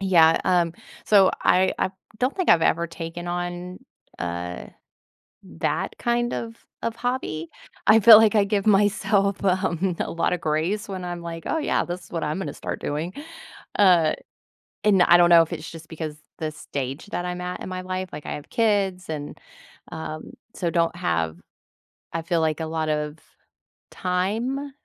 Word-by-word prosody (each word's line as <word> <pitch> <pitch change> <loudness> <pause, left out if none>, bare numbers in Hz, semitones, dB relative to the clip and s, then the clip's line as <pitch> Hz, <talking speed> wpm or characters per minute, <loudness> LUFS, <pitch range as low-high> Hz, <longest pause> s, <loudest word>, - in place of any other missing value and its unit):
Yeah. 170 -4 +5
Um, 175 -3 +2 0.3
so 195 -3 +6
I, 185 +1 +4
uh, - - +1 0.3
don't 255 +6 0
think 370 - -1
I've 165 - +6
ever 170 +1 +2
taken 165 +1 -7
on, 175 +1 -4 0.4
uh, 90 0 -4 0.8
that - - -3
kind 240 0 0
of 230 0 -4 0.3
of 230 - -2
hobby. 245 -11 -3 0.4
I 220 - +8
feel 220 0 +10
like 220 -1 +4
I 205 - +5
give 200 0 -1
myself, 200 -1 +2
um, 185 -2 +1
a - - -1
lotta 170 +1 0
grace 165 +8 -1
when 185 -2 -5
I'm 175 -1 -5
like, 165 -1 -7
"Oh, - - 0
yeah, 300 - 0
this 175 0 -6
is - - -18
what 165 - -2
I'm 150 +4 -2
gonna 195 - -4
start - - -5
doing." 155 +5 -3 0.7
Uh, 175 -6 +5 0.7
and 200 -3 +4
I 175 - +7
don't 175 0 +5
know 170 -1 +9
if 165 - -5
it's - - -6
just 165 -1 -11
because 155 -2 -6 0.2
the 155 -1 -2
stage 140 +1 -5
that 175 - -3
I'm 180 0 -4
at 180 0 -5
in - - -6
my 185 0 -4
life. 185 0 -4
Like, 150 - -8
I - - -4
have 145 - -9
kids, 200 -6 +1
and, 145 -2 -5 0.5
um, 155 -1 -6 0.2
so 170 -3 -1
don't 165 -1 +1
have, 80 -1 -1 0.8
I 165 - -1
feel 170 0 0
like, 160 0 0
a 160 - -2
lot 160 0 -2
of 150 0 -2 0.7
time 225 +10 -2
175 Hz, 175 wpm, -24 LUFS, 160-200 Hz, 0.8 s, feel